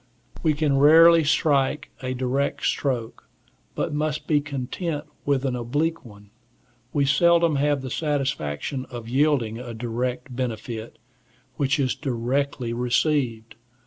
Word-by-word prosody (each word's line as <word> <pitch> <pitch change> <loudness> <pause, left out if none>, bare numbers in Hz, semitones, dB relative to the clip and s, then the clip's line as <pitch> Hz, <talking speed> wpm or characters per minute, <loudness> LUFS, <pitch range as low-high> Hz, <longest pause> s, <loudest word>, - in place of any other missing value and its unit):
We 155 -2 +2
can 145 -2 +1
rarely 165 +3 +7
strike 145 -2 +1
a 130 0 -3
direct 130 +2 -1
stroke, 125 -5 -2 0.5
but - - -2
must 150 0 -2
be 150 -2 +2
content 145 +3 -4 0.2
with 140 -1 +1
an 130 -2 0
oblique 145 +8 -1
one; 105 -4 -15 0.6
we 140 -1 +1
seldom 170 +2 +4
have 145 -1 +1
the 130 - -5
satisfaction 135 - -2
of 120 -2 -8
yielding 130 -4 +1
a 120 -2 -7
direct 125 +2 -3
benefit, 115 -2 -5 0.6
which 140 0 +1
is 130 -2 +1
directly 130 -1 -2
received. 120 -2 0
135 Hz, 125 wpm, -24 LUFS, 120-150 Hz, 0.6 s, rarely